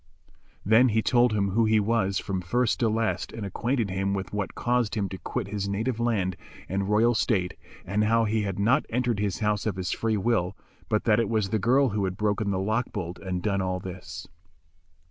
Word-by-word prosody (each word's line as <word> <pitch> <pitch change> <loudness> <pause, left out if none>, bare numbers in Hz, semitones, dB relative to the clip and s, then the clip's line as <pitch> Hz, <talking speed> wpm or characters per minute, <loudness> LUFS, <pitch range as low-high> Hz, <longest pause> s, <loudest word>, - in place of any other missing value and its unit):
Then 115 +5 +5
he 110 0 +1
told 120 -1 +4
him 100 -2 +1
who 115 +3 +3
he 110 0 +4
was 105 -2 +1
from 95 -2 -2
first 120 +6 0
to 115 - +2
last 115 +1 -1
and 110 -2 -6
acquainted 115 +2 -1
him 95 +1 -1
with 95 +1 -5
what 105 -2 -3
caused 120 -3 0
him 100 -3 0
to 95 - -7
quit 115 -6 -4
his 100 -1 -3
native 110 +4 -1
land 100 -6 0 0.3
and 100 +1 -2
royal 110 +3 +4
state, 95 -5 0 0.3
and 105 +4 +1
how 115 +1 +3
he 110 +1 0
had 100 -3 -3
not 115 +7 +2
entered 120 -2 0
his 105 0 -2
house 105 0 0
of 105 - -1
his 95 0 -3
free 110 -1 0
will, 100 -3 0 0.3
but 110 - +1
that 110 -1 +3
it 115 - 0
was 110 -4 0
the 110 - +1
girl 130 +6 +3
who 100 -2 -1
had 95 0 -3
broken 105 0 0
the 95 - 0
lock 110 +6 -1
bolt 90 -4 -5
and 90 -2 -4
done 100 -2 0
all 95 -1 -1
this. 95 0 -8
105 Hz, 215 wpm, -26 LUFS, 95-115 Hz, 0.3 s, Then